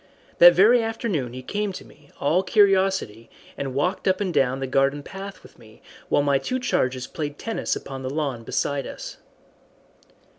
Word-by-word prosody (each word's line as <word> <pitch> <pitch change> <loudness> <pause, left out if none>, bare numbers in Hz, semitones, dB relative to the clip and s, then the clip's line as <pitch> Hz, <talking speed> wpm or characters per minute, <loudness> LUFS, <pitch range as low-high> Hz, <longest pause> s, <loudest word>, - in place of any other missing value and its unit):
That 175 0 +9
very 225 +7 +6
afternoon 215 - -2
he 130 0 -8
came 205 +7 -2
to - - -9
me, 145 -1 -20
all 160 +6 +2
curiosity, 190 - +2 0.3
and 135 -2 -5
walked 180 +9 -1
up 185 0 +2
and 190 -4 -2
down 135 -2 +1
the 135 - -2
garden 135 +2 +1
path 195 +3 -9
with - - -18
me, 110 -1 -18 0.3
while 145 - +3
my 140 -1 +2
two 255 - -2
charges 130 - -1
played 145 0 -5
tennis 225 -1 -2
upon 135 -1 -7
the 130 - -4
lawn 140 -5 -3
beside 140 +4 -2
us. - - -8
145 Hz, 175 wpm, -24 LUFS, 135-195 Hz, 0.3 s, That